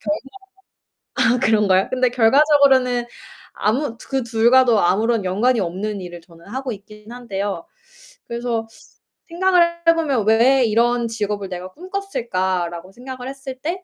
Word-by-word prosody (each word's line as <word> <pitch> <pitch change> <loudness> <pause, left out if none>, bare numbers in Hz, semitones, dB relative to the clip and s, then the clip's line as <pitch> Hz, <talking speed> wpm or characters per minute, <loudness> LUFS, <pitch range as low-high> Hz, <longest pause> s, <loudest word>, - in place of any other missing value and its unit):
결과 300 0 -4 1.0
아 - - -3
그런가요? 210 -5 +2
근데 255 -1 +2
결과적으로는 260 0 +3 0.5
아무 235 +3 -1
두 - - -14
그 270 -1 0
둘과도 235 0 +3
아무런 215 +4 +1
연관이 225 +7 +1
없는 195 +4 -3
일을 175 -1 -9
저는 170 -1 -19
하고 260 +5 -5
있긴 210 +2 -13
한데요. 205 +1 -5 0.6
그래서 235 -1 -3 0.6
생각을 360 +1 +3 0.3
해 330 - +8
보면 280 -10 0
'왜 245 +4 +4
이런 235 +2 +1
직업을 210 -3 -3
내가 180 0 -6
꿈꿨을까?'라고 190 - -3
생각을 255 +1 -8
했을 270 -1 -8
때 360 +4 -4
235 Hz, 305 characters per minute, -20 LUFS, 205-265 Hz, 1.0 s, 해